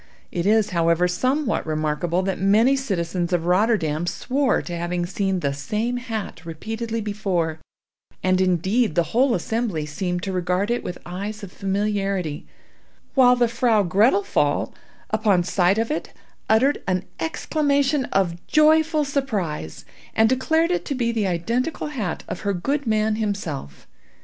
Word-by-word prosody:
It 175 +1 -1
is, 215 -1 +3
however, 170 0 +2
somewhat 255 +7 0
remarkable 155 +3 -1
that 190 -2 -2
many 220 +7 +4
citizens 180 -8 -2
of 170 -2 +1
Rotterdam 180 -4 +1
swore 265 +7 0
to 175 - -5
having 175 +1 -2
seen 195 -1 -1
the 140 -3 0
same 215 - -2
hat 220 -9 -5
repeatedly 225 +7 -4
before; 190 -7 -1 0.6
and 185 0 +3
indeed 185 +3 +1
the 170 - +4
whole 250 +1 +4
assembly 220 -9 -2
seemed 180 +4 -3
to 195 - -2
regard 185 +3 0
it 240 - -1
with 180 - -5
eyes 200 +4 -5
of 190 - -8
familiarity; 195 -5 -2 0.7
while 250 -2 +6
the 245 -1 +3
vrow 230 -4 +2
Grettel 200 +4 +4
Pfaall, 145 -5 0 0.4
upon 210 -4 +2
sight 180 +2 +2
of 225 +3 0
it, 310 - -3 0.4
uttered 255 +7 +3
an 185 0 0
exclamation 285 -3 +1
of 185 -6 0
joyful 310 0 +4
surprise, 205 - -3 0.3
and 220 0 +5
declared 320 +7 +2
it 355 - 0
to 280 - -2
be 235 -2 0
the 220 -4 0
identical 235 - -1
hat 220 - -3
of - - -5
her 200 -1 -1
good 275 +10 -2
man 215 0 +1
himself. 175 - -4
200 Hz, 150 wpm, -23 LUFS, 175-240 Hz, 0.7 s, while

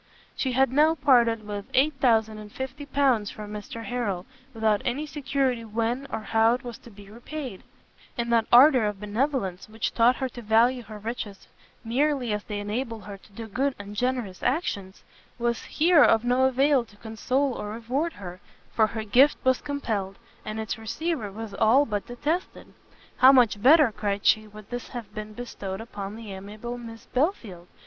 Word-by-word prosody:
She 260 -2 -1
had 265 0 +3
now 305 +4 +4
parted 235 -7 +3
with 205 -1 -5
8050 260 0 0
pounds 260 -7 +2
to - - -12
Mr 210 +2 -7
Harrel, 205 -7 -2 0.3
without 220 -3 +1
any 270 +5 -2
security 270 -5 -1
when 230 +5 -2
or - - -3
how 225 +2 +3
it 255 - -8
was 240 -2 -8
to - - -14
be 205 -2 -14 0.2
paid; 275 -11 -6 0.6
and 235 0 -1
that 230 -1 +3
ardour 255 -1 +7
of 205 -2 -4
benevolence 210 -3 -2
which 220 +1 -3
taught 240 +2 +4
her 265 - -2
to 240 - -10
value 235 +3 +3
her 215 -1 -10
riches 210 -2 -6 0.4
merely 255 0 0
as 210 0 -3
they 210 -1 -4
enabled 220 +2 -4
her 200 -1 -9
to 205 - -21
do 225 +3 -8
good 260 +5 -1
and 205 0 -9
generous 245 -5 -2
actions, 200 - -2 0.3
was 235 -1 -1
here 325 0 +4
of 225 +1 +4
no 250 +2 +3
avail 265 0 +3
to 210 -3 -20
console 255 +5 -1
or 210 - -5
reward 255 +9 -2
her, 180 -2 -9 0.3
for 220 -1 +3
her 220 +1 -5
gift 255 +7 +4
was 260 0 +2
compelled, 215 -9 -3 0.3
and 215 +1 -5
its 220 0 -4
receiver 230 0 -3
was 220 0 -7
all 225 +8 +4
but 205 -4 -3
detested. 300 +9 -4 0.4
"How 260 +1 +8
much 240 -6 +4
better," 285 0 +6
cried 205 -1 -3
she, 215 0 +4
"would 210 +1 -14
this 245 0 -5
have 240 -5 -8
been 215 0 -7
bestowed 200 -5 -6
upon 205 -3 -7
the 220 -3 -8
amiable 215 +5 -7
Miss 225 -1 -10
Belfield! 235 - -2
230 Hz, 175 wpm, -26 LUFS, 210-260 Hz, 0.6 s, How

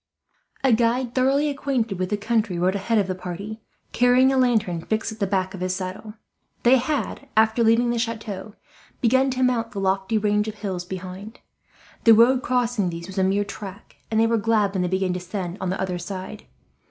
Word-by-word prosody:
A 265 -3 +4
guide 235 +2 +1
thoroughly 270 +3 +2
acquainted 265 -8 -2
with 185 0 -1
the 210 - 0
country 215 -3 0
rode 180 +2 +2
ahead 200 +3 0
of 205 - +3
the 185 - -2
party, 185 +4 -7 0.3
carrying 250 +2 +4
a - - +1
lantern 220 -9 +1
fixed 220 +5 -2
at 220 - -10
the 200 - 0
back 190 0 -1
of 190 - -7
his 185 0 -1
saddle. 190 +3 -6 0.5
They 250 +2 +6
had, 280 +1 -3
after 220 +2 +4
leaving 230 +2 +3
the 240 - -1
chateau, 220 -3 -4 0.4
begun 260 +3 +3
to 260 0 -1
mount 245 -2 0
the 200 - -4
lofty 195 +3 0
range 210 0 +1
of 215 - -5
hills 190 -4 -4
behind. 190 +4 -8 0.7
The 225 -1 +8
road 250 +3 +5
crossing 245 -7 0
these 170 0 -6
was 190 +1 -5
a - - +3
mere 200 +2 +1
track, 200 0 -10
and 220 0 +1
they 225 - +5
were 230 0 +2
glad 210 -2 +1
when 190 - 0
they 180 - 0
began 190 0 0
to 180 - -3
descend 180 0 -5
on 185 - -1
the 185 - -2
other 180 -2 -2
side. 190 +3 -7
215 Hz, 205 wpm, -23 LUFS, 190-235 Hz, 0.7 s, The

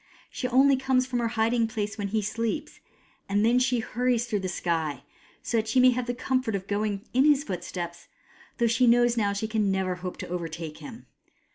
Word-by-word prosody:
She 250 - -3
only 265 +2 +4
comes 260 -1 +1
from 250 -1 -2
her 235 - 0
hiding 230 +1 +1
place 210 -2 -3
when 205 -1 -3
he 215 +1 -1
sleeps; 230 +7 -3 0.5
and 205 +2 +2
then 240 +2 +4
she 250 -1 +2
hurries 240 +1 0
through 215 -4 -1
the 190 -1 -3
sky, 160 -6 -2 0.4
so 235 - -1
that 220 0 0
she 255 +4 +2
may 255 0 +7
have 250 0 -2
the 245 - -2
comfort 255 -3 -1
of 190 -1 -4
going 205 +1 -2
in 260 +2 +4
his 290 -2 +4
footsteps, 175 -4 -6 0.5
though 235 - +2
she 235 +2 +3
knows 240 0 +4
now 220 -3 +1
that 200 - -2
she 220 - -2
can 215 -2 0
never 190 -1 -1
hope 180 0 -6
to - - -6
overtake 165 -2 -5
him. 240 -3 -10
225 Hz, 215 wpm, -27 LUFS, 195-245 Hz, 0.5 s, may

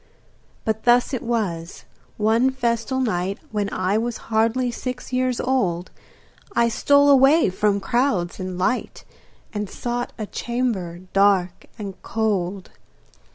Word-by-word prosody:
But 220 0 -1
thus 245 +3 +4
it 255 - -1
was: 195 -8 -3 0.3
one 225 +4 +3
festal 240 -1 -1
night 195 -5 -1
When 205 -2 -1
I 190 +3 0
was 235 0 -2 0.2
hardly 230 +3 +2
six 250 +1 -6
years 255 -1 +1
old 185 -10 0 0.6
I 235 0 +4
stole 285 +5 +4
away 275 - +5
from 200 +1 +1
crowds 200 -5 0
and 185 -1 -4
light 245 +8 -1 0.5
And 210 -2 -3
sought 240 +2 -3
a 215 - -3
chamber 210 -8 -3
dark 195 -3 +2
and 195 -3 -7
cold. 200 -4 -2
220 Hz, 125 wpm, -22 LUFS, 190-250 Hz, 0.6 s, away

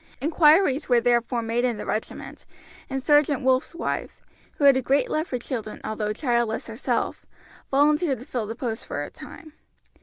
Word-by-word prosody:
Inquiries 305 0 +3
were 245 -1 +5
therefore 240 0 +1
made 230 +2 -1
in 245 -3 0
the - - -6
regiment, 215 - -5 0.4
and 270 -1 -3
Sergeant 295 -2 +3
Wolf's 260 +5 +1
wife, - - -4 0.3
who - - -5
had 280 -1 +7
a 260 - +1
great 270 +3 +1
love 310 +2 -1
for 250 - -2
children 235 -3 -5
although 215 -1 -2
childless 235 -1 -1
herself, 225 +3 -2 0.5
volunteered 295 +1 +2
to 250 - -11
fill 235 -6 -3
the 225 - -5
post 230 -3 -4
for - - -3
a - - -8
time. 310 -2 -12
255 Hz, 175 wpm, -24 LUFS, 235-290 Hz, 0.5 s, had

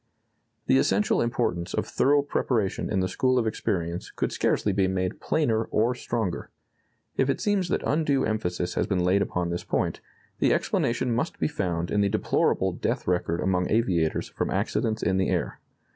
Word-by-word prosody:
The 65 - +4
essential 95 +9 +2
importance 115 -7 -1
of - - 0
thorough 145 +1 +2
preparation 120 -7 -1
in 95 -3 +1
the 95 - +1
school 130 +6 +1
of 120 - +2
experience 85 -5 -2
could - - -2
scarcely 105 - +1
be 95 -1 +2
made 95 -1 -2
plainer 115 -8 +1
or 115 +4 +1
stronger. 115 -6 -3 0.7
If 135 - +2
it 135 - 0
seems 200 -4 0
that - - 0
undue 145 -3 +1
emphasis 90 -5 -2
has - - 0
been 95 -3 0
laid 95 +3 +3
upon 90 -1 -1
this 85 - -3
point, - - -1 0.4
the - - +3
explanation 120 +1 0
must 125 +8 -2
be - - +1
found 90 - -2
in 105 - +2
the 100 - +2
deplorable 110 +2 +1
death - - -2
record 90 -2 0
among 90 -1 +1
aviators 90 -8 +1
from - - -3
accidents 110 0 -1
in 95 +2 +2
the 95 - +1
air. - - -1
100 Hz, 175 wpm, -26 LUFS, 90-120 Hz, 0.7 s, The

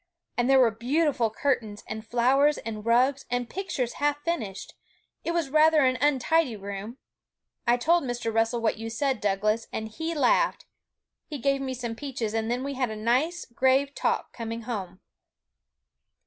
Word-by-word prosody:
And 245 +1 +1
there 270 - +6
were 240 -3 +5
beautiful 250 +1 +1
curtains, 220 -3 -1
and 220 0 -5
flowers, 260 +6 +3
and 215 -2 -6
rugs, 255 +4 +3
and 245 0 -1
pictures 265 -8 -3
half 290 0 +2
finished. 220 - -3 0.5
It - - -3
was 335 -5 -1
rather 310 -1 +5
an 255 0 +1
untidy 290 -1 +2
room. 200 +4 -7 0.7
I 240 +1 +5
told 335 +7 +3
Mr. 240 -2 -3
Russell 225 +1 +1
what 220 -1 0
you 225 0 -4
said, 260 +1 -1
Douglas; 210 +3 0
and 220 - -4
he 320 +8 -4
laughed. - - +2 0.6
He 300 - -5
gave 275 +1 +1
me 260 -1 -3
some 240 -2 -4
peaches, 240 -5 -4
and 225 0 -1
then 245 +2 -1
we 280 0 -3
had 255 -3 -1
a 215 - -5
nice 255 +11 0
grave 265 +3 +2
talk - - -1
coming 230 0 -5
home.' 195 -6 -5
245 Hz, 165 wpm, -27 LUFS, 225-285 Hz, 0.7 s, there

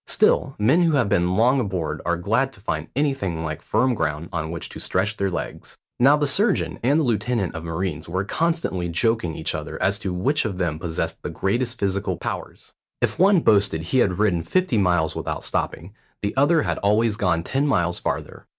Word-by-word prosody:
Still, - - +2
men 130 +12 +3
who 165 -2 +3
have 125 -8 +2
been 90 0 +2
long 125 +6 +4
aboard 95 -9 -2
are 85 -1 +1
glad 115 +10 +1
to - - -18
find 100 - -3
anything 125 - -1
like 80 0 -4
firm 125 +8 +1
ground 80 -5 -2
on 80 -2 -2
which 85 0 -4
to - - -9
stretch 100 +4 -1
their 100 -2 0
legs. 90 - -6 0.2
Now 140 +4 +6
the 150 - +1
surgeon 200 - +1
and 140 +6 +3
the - - +2
lieutenant 115 - 0
of 80 - -6
marines 85 0 -4
were 95 +2 -1
constantly 160 - -1
joking 85 -1 0
each 80 - -2
other - - -5
as 100 +3 +1
to 100 -4 -3
which 135 +13 +1
of 100 -5 -3
them 85 -4 -1
possessed 80 -1 -3
the - - -4
greatest 120 +5 -1
physical 100 0 -1
powers. - - -6 0.3
If - - -1
one 190 -1 +5
boasted 100 - +3
he 110 +11 +1
had 95 -7 +2
ridden 95 -5 +2
fifty 180 - +1
miles 90 -5 +2
without - - -4
stopping, 85 +5 -3 0.3
the 100 - -2
other 150 +4 +4
had - - -2
always 105 +2 +2
gone 90 -6 0
ten 135 +10 0
miles 85 -10 +1
farther. - - -4
100 Hz, 200 wpm, -23 LUFS, 85-130 Hz, 0.3 s, Now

